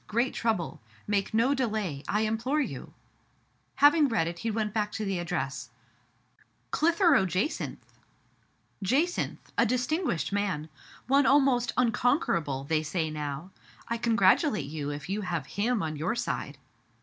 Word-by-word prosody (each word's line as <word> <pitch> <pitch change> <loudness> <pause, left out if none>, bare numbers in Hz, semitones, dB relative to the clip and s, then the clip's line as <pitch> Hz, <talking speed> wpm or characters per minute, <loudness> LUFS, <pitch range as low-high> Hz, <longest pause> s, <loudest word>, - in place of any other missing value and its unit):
Great 235 +4 0
trouble! 220 - -1 0.2
Make 205 -1 0
no 230 +5 +3
delay, 215 - -2
I 210 - +1
implore 225 +7 0
you? 295 - -4 0.8
Having 290 +2 +6
read 225 -10 +1
it, 170 0 -5
he 230 - -2
went 215 -1 -1
back 210 -1 0
to 215 - -3
the 195 -2 -1
address 175 -1 -3 0.3
— - - -40
" - - -36
CHtheroe 330 - +4
Jacynth! 185 - -2 0.4
'* - - -39
" - - -17
Jacynth! 295 - +1 0.2
— - - -36
a 230 - +5
distinguished 250 - -1
man. 185 -7 -1 0.4
One 275 +1 +4
almost 270 -3 +4
unconquerable, 210 - +1
they 155 +2 +1
say 160 0 -2
now. 150 +3 -5 0.4
I 230 0 -1
congratulate 225 - +3
you 145 0 -4
if 145 0 -6
you 200 +3 -2
have 170 -7 -3
him 220 +4 -1
on 155 -1 -3
your 165 +10 -1
side. 140 -10 -3
210 Hz, 155 wpm, -28 LUFS, 170-250 Hz, 0.8 s, Having